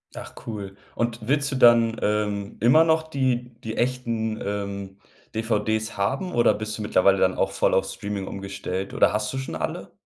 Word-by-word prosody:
Ach - - -8
cool, 100 -4 -6 0.2
und 115 -1 -2
willst 140 +1 +1
du 135 - -2
dann, 115 -2 +5
ähm, 105 -1 -1
immer 130 +8 +6
noch 160 -1 +2
die 125 -3 0
die 110 0 -5
echten, 115 -3 -1
ähm, 100 -1 -4 0.4
DVDs 110 0 -1
haben 135 - -1
oder 120 -1 +4
bist 110 0 -4
du - - -6
mittlerweile 100 -1 +3
dann 95 0 +3
auch - - 0
voll - - +2
auf - - +2
Streaming 100 -1 -5
umgestellt 95 -1 -5
oder - - +4
hast 105 0 -1
du 135 - -4
schon 130 -9 -4
alle? 80 - -4
110 Hz, 180 wpm, -24 LUFS, 100-120 Hz, 0.4 s, immer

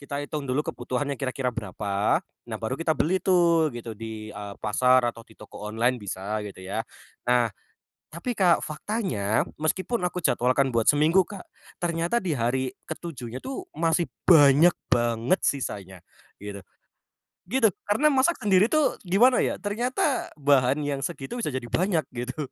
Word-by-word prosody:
kita 140 0 -5
hitung 145 0 -4
dulu 130 +4 +1
kebutuhannya 135 +3 -3
kira-kira 130 -1 -1
berapa, 100 -1 -1 0.3
nah - - -3
baru 115 +3 -2
kita 165 0 +1
beli 185 +5 +2
tuh 170 -4 +4
gitu, 120 -1 -6
di, 110 -1 -7
eee, 100 -1 -7
pasar 125 +4 +4
atau 115 - -13
di - - -18
toko 105 - -12
online 120 +3 +1
bisa 100 +2 -4
gitu 95 -2 -10
ya. 100 +4 -3 0.4
Nah, 120 -1 +3 0.6
tapi 170 +10 -4
Kak 180 -4 +3
faktanya, 155 - -1 0.2
meskipun 185 +9 0
aku 180 0 -1
jadwalkan 130 +2 +2
buat 115 -1 +1
seminggu 155 +6 +4
Kak, 200 -3 -9 0.3
ternyata 170 +5 0
di 175 -4 0
hari 130 +2 0 0.2
ke - - -4
7-nya 130 -7 -7
tuh 320 +8 -6
masih 165 0 +1 0.2
banyak 150 0 +7 0.2
banget 120 +8 +2
sisanya 100 -9 -3 0.4
gitu, 100 -1 -8 0.9
gitu. 230 +1 +4 0.2
Karena 220 +9 +3
masak 270 +6 +3
sendiri 200 +1 +4
tuh 310 +1 +1
gimana 240 +8 +5
ya, - - 0
ternyata 245 +6 -1
bahan 140 -2 +3
yang 140 -1 -2
segitu 135 - -4
bisa 215 - -1
jadi 130 -1 -3
banyak 170 - +1
gitu. 130 +4 -4
140 Hz, 155 wpm, -26 LUFS, 115-180 Hz, 0.9 s, banyak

